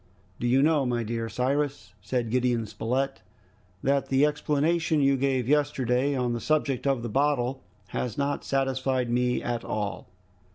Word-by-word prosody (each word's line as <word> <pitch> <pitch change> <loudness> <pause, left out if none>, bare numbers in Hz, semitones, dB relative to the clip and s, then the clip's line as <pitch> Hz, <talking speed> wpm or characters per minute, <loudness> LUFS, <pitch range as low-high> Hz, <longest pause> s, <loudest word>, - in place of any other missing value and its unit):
"Do 120 - -1
you 130 +3 +4
know, 155 -2 +3
my 120 -2 0
dear 115 0 -3
Cyrus," 130 -1 -1
said 120 -3 -2
Gideon 125 -2 +1
Spilett, 130 +5 -2 0.6
"that 140 0 +1
the 135 +2 +4
explanation 155 +2 +1
you 140 -1 +4
gave 130 -2 0
yesterday 140 -2 +1
on 125 -2 0
the 120 - -3
subject 145 -4 0
of 135 -4 +1
the - - -2
bottle 135 +1 0 0.3
has 125 -3 -3
not 140 0 -1
satisfied 130 -2 0
me 125 0 +1
at 120 -1 -2
all! 105 -1 -3
130 Hz, 155 wpm, -27 LUFS, 120-140 Hz, 0.6 s, you